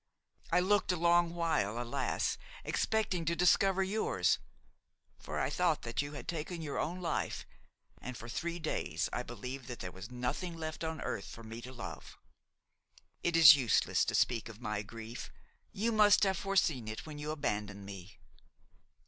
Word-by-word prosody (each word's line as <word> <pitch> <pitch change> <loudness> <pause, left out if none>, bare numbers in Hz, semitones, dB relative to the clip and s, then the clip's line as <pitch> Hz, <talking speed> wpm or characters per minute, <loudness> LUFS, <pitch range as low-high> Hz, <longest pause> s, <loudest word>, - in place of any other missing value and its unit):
I 180 +2 +5
looked 195 +1 +3
a - - +1
long 170 0 +3
while, 140 -11 0
alas! 120 +2 -1 0.2
expecting 210 -6 0
to 170 +2 +1
discover 190 +3 +4
yours; 190 - +1 0.8
for - - -4
I - - 0
thought - - +1
that 115 +3 -1
you 145 +1 -6
had 145 - -8
taken 170 +1 -3
your 145 -2 -3
own 180 +3 -2
life, 170 - -2 0.6
and 125 -1 -6
for 115 - -9
three 170 +8 -3
days 90 - -2
I - - 0
believed 125 +2 -7
that 125 -2 -6
there 90 - -5
was 95 +5 -9
nothing 125 +8 -3
left 160 0 -5
on 160 0 -3
earth 100 - -3
for 115 - -10
me 115 +1 -7
to 125 - -8
love. 125 - -8 1.0
It 170 - +1
is 155 -4 +11
useless 130 -5 +2
to - - -1
speak 115 -2 +2
of 110 -1 -11
my 105 -4 -2
grief; 115 +3 -8 0.4
you 225 +4 0
must 210 -2 +6
have 190 -2 +2
foreseen 165 - +1
it 110 0 -5
when 150 -2 -8
you 150 +1 -4
abandoned 105 -9 -2
me. 95 -1 -9
145 Hz, 170 wpm, -33 LUFS, 115-175 Hz, 1.0 s, is